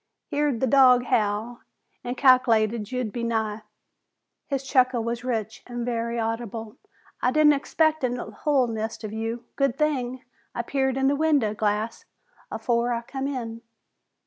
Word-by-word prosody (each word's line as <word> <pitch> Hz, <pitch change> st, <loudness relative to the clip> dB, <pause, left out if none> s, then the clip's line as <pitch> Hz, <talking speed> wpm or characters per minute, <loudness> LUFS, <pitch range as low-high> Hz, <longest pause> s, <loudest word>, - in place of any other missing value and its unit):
Heerd 290 Hz, -5 st, 0 dB
the -, -, +3 dB
dog 255 Hz, -1 st, +6 dB
howl 220 Hz, +1 st, 0 dB, 0.4 s
an' 245 Hz, +1 st, -3 dB
calc'lated 235 Hz, -5 st, +3 dB
you'd 250 Hz, -4 st, -2 dB
be 240 Hz, -, -3 dB
nigh." 220 Hz, -2 st, -1 dB, 0.9 s
His 275 Hz, -2 st, -2 dB
chuckle 255 Hz, -3 st, +2 dB
was 235 Hz, +1 st, -3 dB
rich 225 Hz, -4 st, -3 dB
and 240 Hz, -1 st, -4 dB
very 235 Hz, -1 st, -2 dB
audible. 225 Hz, 0 st, -4 dB, 0.4 s
"I 250 Hz, -, +3 dB
didn't 300 Hz, +2 st, +5 dB
expect 315 Hz, +2 st, +1 dB
a 255 Hz, -, +2 dB, 0.3 s
hul 285 Hz, -4 st, +3 dB
nest 225 Hz, -1 st, -4 dB
of 215 Hz, -1 st, -5 dB
you. 225 Hz, +2 st, -3 dB
Good 275 Hz, -2 st, +1 dB
thing 260 Hz, -4 st, -1 dB, 0.3 s
I 235 Hz, -, -1 dB
peered 265 Hz, +1 st, 0 dB
in 270 Hz, -, +1 dB
the 280 Hz, -, +3 dB
window 285 Hz, -8 st, +2 dB
glass 215 Hz, +1 st, -2 dB, 0.4 s
afore 240 Hz, 0 st, 0 dB
I 235 Hz, 0 st, -2 dB
come 270 Hz, +3 st, -4 dB
in." 230 Hz, -4 st, -5 dB
240 Hz, 150 wpm, -25 LUFS, 225-265 Hz, 0.9 s, dog